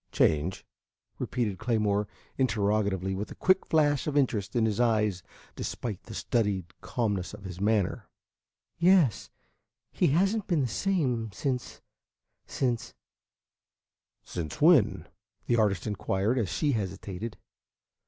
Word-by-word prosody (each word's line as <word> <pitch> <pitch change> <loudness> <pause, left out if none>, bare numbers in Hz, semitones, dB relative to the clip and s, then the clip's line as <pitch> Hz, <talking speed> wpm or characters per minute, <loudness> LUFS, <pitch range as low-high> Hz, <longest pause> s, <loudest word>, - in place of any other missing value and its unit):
"Change?" 80 +5 +1 0.5
repeated 110 -6 -2
Claymore 105 -3 +1 0.3
interrogatively, 100 -5 +1
with 100 +2 -4
a - - -9
quick 185 +1 +2
flash 145 -3 +2
of 145 -1 0
interest 110 -7 0
in 115 -2 +3
his 110 -1 0
eyes 105 -6 +2 0.3
despite 110 -6 -4
the - - -9
studied 100 -6 -1
calmness 100 -7 -2
of - - -14
his 95 -1 -7
manner. 105 -2 0 0.7
"Yes. 170 - +4 0.6
He - - +2
has 190 +9 +3
n't 215 -3 -3
been 170 -5 +2
the 130 - +1
same 125 - 0
since 125 +3 -3 0.7
since 120 -3 -2 0.6
" - - -62
"Since 80 -4 -5
when?" 130 - +4 0.4
the 120 - +2
artist 100 -5 +1
inquired, 105 +3 0
as 105 -6 -1
she 145 - 0
hesitated. 100 0 -4
110 Hz, 125 wpm, -28 LUFS, 100-130 Hz, 0.7 s, Yes